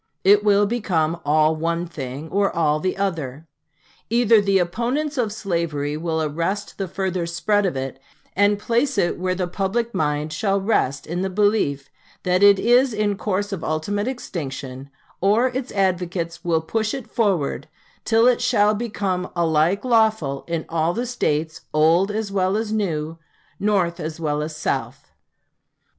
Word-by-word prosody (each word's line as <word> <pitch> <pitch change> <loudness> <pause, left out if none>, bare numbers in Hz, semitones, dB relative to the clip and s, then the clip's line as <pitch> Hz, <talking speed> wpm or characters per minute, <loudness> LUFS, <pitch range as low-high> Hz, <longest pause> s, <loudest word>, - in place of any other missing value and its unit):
It 205 +2 +5
will 205 -1 +4
become 175 -8 0
all 155 +1 +3
one 165 +2 -1
thing 140 -2 -6
or 200 +2 +2
all 155 -2 +2
the 185 +4 -2
other. 160 -7 -3 0.6
Either 230 -2 +4
the 195 -1 +2
opponents 245 - -1
of 235 -6 0
slavery 170 -8 -2
will 160 0 -1
arrest 170 +9 -3
the 195 - -2
further 185 -1 -2
spread 195 +4 +1
of 170 - -3
it, 135 0 -5 0.4
and 205 +1 +3
place 235 +5 0
it 175 -3 +1
where 185 0 -1
the 180 -1 -2
public 205 +6 -2
mind 150 -3 -1
shall 195 +3 0
rest 145 - 0
in 175 +3 -3
the 190 - -1
belief 190 -9 +1 0.4
that 180 0 +1
it 200 -1 +7
is 245 +4 +3
in 210 -1 0
course 205 +1 -2
of 180 - -5
ultimate 200 +8 -1
extinction; 140 - -5 0.3
or 215 +7 +3
its 255 +1 -4
advocates 180 -3 -1
will 165 -3 +1
push 220 +8 -1
it 265 -4 -6
forward 175 - -1 0.4
till 225 0 +3
it 250 -1 +4
shall 215 -4 +3
become 200 -5 -2
alike 170 +5 +2
lawful 220 - +2
in 165 -2 -2
all 165 +1 0
the 240 +2 -1
States, 160 -10 -1
old 165 +5 +4
as 210 -1 -3
well 190 0 +1
as 220 -1 -2
new, 165 -6 -2 0.4
North 190 -4 +1
as 155 0 -5
well 150 -2 -1
as 155 0 -4
South." 155 - -3
185 Hz, 160 wpm, -22 LUFS, 160-210 Hz, 0.6 s, it